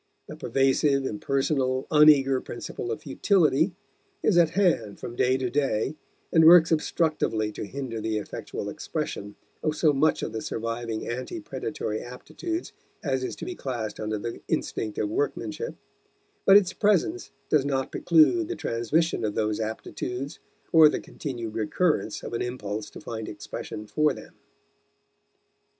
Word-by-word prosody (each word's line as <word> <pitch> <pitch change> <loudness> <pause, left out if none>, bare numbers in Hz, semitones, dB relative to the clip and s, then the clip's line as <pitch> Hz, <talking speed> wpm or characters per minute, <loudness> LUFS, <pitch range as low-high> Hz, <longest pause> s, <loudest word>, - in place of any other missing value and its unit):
The - - -9
pervasive, 135 +1 +2
impersonal, 130 +2 0
un 150 0 +8
eager 135 -3 +4
principle 120 0 -6
of 115 - -5
futility 160 +2 +2 0.5
is 210 - +3
at 170 -2 +5
hand 160 - +2
from 120 - -7
day 130 +1 +3
to 130 -1 -1
day 135 -2 0 0.4
and 160 - +6
works 165 0 +8
obstructively 155 -9 0
to 105 - -5
hinder 125 -3 -5
the 110 0 -1
effectual 105 - -5
expression 105 0 -4 0.3
of 155 -1 0
so 155 -2 +3
much 150 +3 +2
of - - -3
the 110 - -3
surviving 115 0 -3
ante 130 - -4
predatory 150 - -4
aptitudes 330 - -5 0.3
as 130 -3 0
is - - -3
to - - -7
be 365 - -4
classed 120 - -4
under 110 0 -2
the 115 +3 -5
instinct 110 -2 -2
of - - 0
workmanship; 430 +6 -2 0.7
but 195 - +10
its 190 -2 +2
presence 210 - +1 0.2
does 150 -3 +4
not 135 -2 -1
preclude 175 - +4
the 360 - -3
transmission 120 +6 0
of 105 -1 -1
those 105 -1 0
aptitudes 125 +4 -4 0.3
or 160 -2 +8
the - - -2
continued 120 -7 -6
recurrence 110 - 0
of - - -6
an 115 - -1
impulse 110 -4 -4
to - - -11
find 110 -2 -6
expression 105 - -7
for 150 +7 +2
them. - - -12
135 Hz, 150 wpm, -26 LUFS, 115-160 Hz, 0.7 s, but